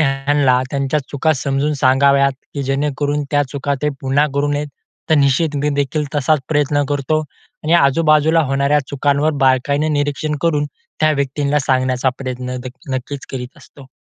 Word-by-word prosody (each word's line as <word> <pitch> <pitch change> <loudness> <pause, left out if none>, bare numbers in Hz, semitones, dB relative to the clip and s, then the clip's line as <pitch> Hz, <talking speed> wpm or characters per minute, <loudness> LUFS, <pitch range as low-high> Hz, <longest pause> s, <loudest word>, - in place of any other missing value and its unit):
ह्यांना 135 -2 +2
त्यांच्या 140 +1 0
चुका 155 +3 +1
समजून 140 +3 -1
सांगाव्यात, 140 0 +3 0.2
की 140 - -2
जेणेकरून 145 +2 -1
त्या 145 -1 +3
चुका 140 0 -1
ते 150 - +2
पुन्हा 135 +3 +2
करू 145 +1 +1
नयेत. 145 0 -2 0.4
तर - - +6
निश्चित 145 +2 +2
मी 145 +1 0
देखील 145 +2 -1
तसाच 145 +1 +2
प्रयत्न 145 -1 +1
करतो 145 +2 0 0.4
आणि 160 - +1
आजूबाजूला 155 +1 +4
होणाऱ्या 140 +2 +2
चुकांवर 145 +2 +1
बारकाईनं 140 +3 +2
निरीक्षण 145 +1 -1
करून, 150 -3 +1 0.3
त्या 155 0 +4
व्यक्तींना 140 +1 0
सांगण्याचा 130 -1 +1
प्रयत्न 125 -1 -5
दे 130 - -4 0.3
नक्कीच 135 +2 -5
करीत 125 -1 -7
असतो. 140 -2 -16
140 Hz, 150 wpm, -18 LUFS, 135-150 Hz, 0.4 s, तर